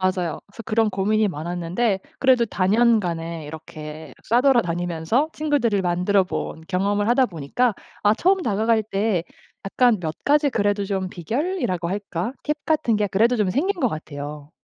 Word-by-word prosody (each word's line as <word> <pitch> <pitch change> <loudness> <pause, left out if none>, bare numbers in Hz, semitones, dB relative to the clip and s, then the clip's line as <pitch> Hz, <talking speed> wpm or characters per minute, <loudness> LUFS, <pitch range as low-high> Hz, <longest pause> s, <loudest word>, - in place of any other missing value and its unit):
맞아요. 185 -3 0
그래서 205 +3 -11
그런 225 0 +2
고민이 210 +2 +1
많았는데 175 +5 -1 0.2
그래도 255 -3 +4
다년간에 185 -6 +1
이렇게 155 0 -9
싸돌아다니면서 220 - +2
친구들을 265 -10 +1
만들어본 180 -1 0
경험을 200 +3 0
하다 255 +2 +4
보니까 195 - -1 0.3
아 205 +1 +5
처음 380 - +2
다가갈 220 - +1
때 200 -4 0 0.4
약간 240 +2 +3
몇 160 -2 -3
가지 295 0 +4
그래도 205 -5 0
좀 190 -2 -2
비결이라고 185 - -2
할까 200 +1 -3
팁 300 0 0
같은 300 -7 +1
게 210 -1 +1
그래도 225 +6 +3
좀 210 -4 +1
생긴 355 - 0
것 255 - +3
같아요. 150 -3 -7
205 Hz, 350 characters per minute, -23 LUFS, 175-235 Hz, 0.4 s, 아